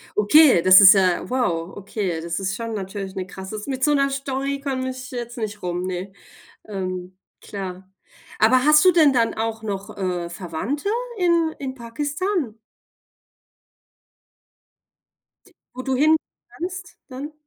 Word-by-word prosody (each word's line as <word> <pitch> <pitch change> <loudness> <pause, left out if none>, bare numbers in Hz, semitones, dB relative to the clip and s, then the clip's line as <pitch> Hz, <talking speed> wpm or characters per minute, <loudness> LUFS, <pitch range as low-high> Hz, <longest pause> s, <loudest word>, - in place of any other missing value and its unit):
Okay, 245 - +6
das 185 +3 +8
ist 195 +1 +10
ja 185 -3 +1
wow, 180 -9 -1
okay, 195 -4 -3
das 170 0 -3
ist 195 0 -2
schon 230 -1 -5
natürlich 195 -1 -6
'ne 190 -1 -3
krasse 190 +3 -7
mit 265 -1 -3
so 295 - +4
'ner 275 -1 +2
Story 275 0 -3
komme 260 -2 -2
ich 255 0 -8
jetzt 240 -1 -6
nicht 210 -2 -5
rum, 175 0 -2
ne. 185 +1 -5 0.6
Ähm, 185 -2 -5 0.2
klar. 190 -2 -8 0.5
Aber 255 +3 +4
hast 300 0 +6
du 370 - +7
denn 310 -5 +5
dann 230 -3 +1
auch 225 0 -3
noch, 200 -2 -5
äh, 180 -3 -3
Verwandte 185 - -4 0.3
in 340 -3 +2
in 265 -2 -5
Pakistan? 290 - -3 2.9
T - - -22 0.2
wo 255 - -6
du 265 0 -1
hin 305 +5 +4 0.3
kannst 360 +1 -7
dann? 275 +3 -7
230 Hz, 145 wpm, -22 LUFS, 190-275 Hz, 2.9 s, ist